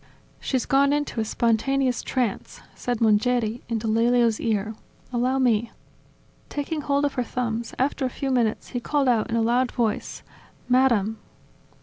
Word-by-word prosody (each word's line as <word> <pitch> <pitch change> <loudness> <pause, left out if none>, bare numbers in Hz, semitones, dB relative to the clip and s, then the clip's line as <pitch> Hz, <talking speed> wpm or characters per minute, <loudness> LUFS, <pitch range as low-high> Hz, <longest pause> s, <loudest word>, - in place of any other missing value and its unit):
"She's 260 -3 -1
gone 280 +1 +3
into 290 -5 -1
a - - +1
spontaneous 245 +4 +1
tranceV 245 -6 -2
said 245 -2 -3
Mongeri 225 +1 +2
into 225 -1 -2
Lelio's 230 0 +3
ear. 215 -1 -1 0.4
"Allow 250 +2 +1
me." 235 -3 +2 0.8
Taking 295 +2 -3
hold 285 0 +1
of 285 - -1
her 250 - -1
thumbs, 235 -1 -3
after 270 +1 0
a 260 - +1
few 270 +2 -3
minutes 235 -4 0
he 245 - -3
called 280 +2 0
out 235 -3 +2
in 230 - -1
a 230 - +2
loud 245 +2 +2
voice: 230 -4 -2 0.4
"Madam! 235 -4 +2
245 Hz, 150 wpm, -24 LUFS, 225-265 Hz, 0.8 s, gone